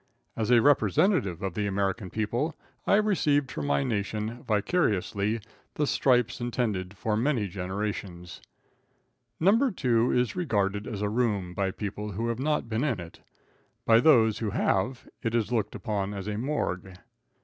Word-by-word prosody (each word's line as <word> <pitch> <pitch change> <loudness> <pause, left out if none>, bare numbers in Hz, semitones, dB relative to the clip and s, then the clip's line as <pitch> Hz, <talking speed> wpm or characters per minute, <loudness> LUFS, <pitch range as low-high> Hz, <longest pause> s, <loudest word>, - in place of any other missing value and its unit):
As 110 -1 -2
a 120 -2 +5
representative 130 - +3
of 95 -2 -2
the 105 +2 -1
American 100 0 -1
people, 120 - -1 0.3
I - - +5
received 150 - +2
for - - -4
my 70 -1 +1
nation, 110 - -2
vicariously, 105 - 0 0.3
the 150 - +1
stripes 125 -3 +2
intended 105 -6 -2
for 105 +2 -1
many 115 -2 +1
generations. 95 -1 -5 1.0
No. 225 +10 +4
2 120 - +1
is 125 -1 +1
regarded 105 - 0
as 105 -1 -4
a 105 - 0
room 105 -6 0
by 95 +1 0
people 105 +1 -5
who 115 +5 -2
have 115 0 -2
not 150 -2 0
been 115 +2 -1
in 130 -10 0
it. 85 -1 -10 0.7
By 115 0 +6
those 115 -6 +5
who 110 - -1
have, 100 +5 0
it 115 0 -1
is 115 0 0
looked 110 -3 -1
upon 105 -3 -3
as 100 0 -5
a 105 - -2
morgue. 95 -8 -2
110 Hz, 155 wpm, -28 LUFS, 100-125 Hz, 1.0 s, By